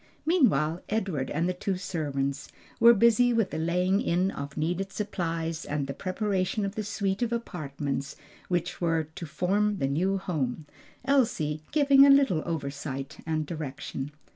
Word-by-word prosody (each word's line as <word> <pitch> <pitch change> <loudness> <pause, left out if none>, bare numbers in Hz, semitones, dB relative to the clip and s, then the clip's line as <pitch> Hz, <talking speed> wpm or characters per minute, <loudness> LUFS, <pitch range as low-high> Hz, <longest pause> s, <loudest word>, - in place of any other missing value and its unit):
Meanwhile 185 - +2
Edward 190 -11 -1
and 165 +3 0
the 180 - 0
two 185 +1 -2
servants 145 -7 -3 0.3
were 235 0 +8
busy 235 +3 +4
with 225 -4 +1
the - - -3
laying 180 +4 +1
in 180 +3 +1
of 140 +1 -7
needed 175 +5 -1
supplies 165 -6 -3
and 145 -1 -2
the 140 - -4
preparation 195 - -1
of 195 - -3
the 215 - -3
suite 200 0 -2
of 240 -1 0
apartments 145 - -4 0.3
which 175 -1 -2
were 165 -2 0
to 170 - -7
form 200 +6 +1
the 135 - 0
new 180 +8 +1
home 155 -6 -3 0.4
Elsie 220 - +1
giving 280 -2 +6
a 280 - +7
little 275 - +5
oversight 140 -3 -4
and 155 -1 0
direction. 145 -3 -5
175 Hz, 155 wpm, -28 LUFS, 150-205 Hz, 0.4 s, were